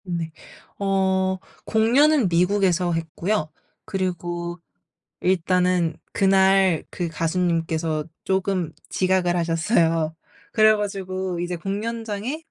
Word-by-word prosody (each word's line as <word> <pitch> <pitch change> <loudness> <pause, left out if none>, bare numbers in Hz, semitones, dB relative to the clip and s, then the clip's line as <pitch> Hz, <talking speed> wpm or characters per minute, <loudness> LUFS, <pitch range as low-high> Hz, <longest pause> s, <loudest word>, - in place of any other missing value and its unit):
네. 170 -3 -4 0.5
어 190 -1 +1 0.3
공연은 250 +4 +4
미국에서 180 0 +2
했고요. 165 +2 -2 0.4
그리고 175 -3 -3 0.6
일단은 180 -2 +1 0.2
그날 190 -3 +4
그 175 -2 -3
가수님께서 165 -1 -1 0.2
쪼금 190 -3 0 0.2
지각을 185 -2 +1
하셨어요. 165 -1 +1 0.4
그래 215 0 +6
가지고 190 -3 -3
이제 175 0 -2
공연장에 215 - -3
185 Hz, 220 characters per minute, -23 LUFS, 170-195 Hz, 0.6 s, 그래